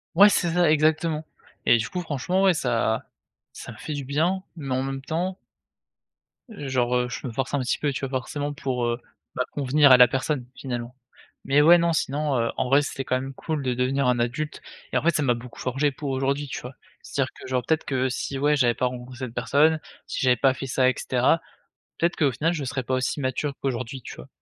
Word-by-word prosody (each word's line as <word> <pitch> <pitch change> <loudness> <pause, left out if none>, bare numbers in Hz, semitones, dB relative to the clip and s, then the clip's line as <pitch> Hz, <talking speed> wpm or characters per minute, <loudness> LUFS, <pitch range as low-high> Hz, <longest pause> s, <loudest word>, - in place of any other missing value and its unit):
Ouais, 205 +1 +9
c'est 175 -3 +1
ça 175 -3 +4
exactement. 155 +1 +2 0.4
Et - - +6
du 115 - -3
coup, 180 - -3
franchement, 175 +4 -1
ouais 190 -2 +5
ça 120 -6 0 0.5
ça - - -9
me - - -15
fait - - -7
du 145 -1 -4
bien, 165 +8 0
mais 140 -5 -6
en 130 - +1
même 135 0 -4
temps 175 +6 -2 1.1
genre 130 - -1
heu 125 0 +1
je 120 - -6
me - - -5
force 135 +3 -2
un 145 - +2
petit 125 -1 -1
peu, 145 - 0
tu 135 - -4
vois? 135 - -3
Forcément 145 +2 -4
pour 130 -4 -2
heu 120 +1 -1 0.3
bah - - 0
convenir 145 0 +4
à 130 - +10
la 125 0 +8
personne, 135 +1 -2
finalement. 120 -2 -5 0.5
Mais 140 +2 +4
ouais, 170 +4 +8
non, 170 0 +2
sinon 145 -2 0
heu, 115 0 0
en - - 0
vrai 140 +2 +5
c'était 135 -1 -4
quand 130 - +1
même 135 +1 -6
cool 155 +1 -3
de 130 -1 0
devenir 130 +2 +1
un 125 -1 +2
adulte 130 +6 -2 0.3
et - - +3
en - - 0
fait, 170 - +4
ça 150 - +1
m'a 125 -3 +3
beaucoup 120 +1 -10
forgé 135 +3 0
pour 140 +1 -5
aujourd'hui, 135 +2 -1
tu - - -5
vois? 125 +2 -8 0.3
C'est-à-dire, 135 -2 -2
que - - -11
genre, 130 -1 0
peut-être 160 -1 +1
que 130 -1 0
si, 135 +2 -3
ouais, 145 +2 +3
j'avais 125 -4 +3
pas - - 0
rencontré 125 0 -7
cette 125 -3 -5
personne, 150 +6 +3 0.3
si - - -4
j'avais 130 -3 +4
pas 135 +2 +3
fait 135 - -6
ça 130 0 +3
et - - +1
cetera, 130 +6 +2 0.6
peut-être 170 +1 +1
qu'au 140 -4 +2
final 150 +7 0
je 155 -5 -3
serais 130 0 -2
pas 130 - -1
aussi 130 +3 -1
mature 140 +2 -1
qu'aujourd'hui, 130 0 -3
tu - - -9
vois? - - -11
135 Hz, 230 wpm, -25 LUFS, 125-150 Hz, 1.1 s, à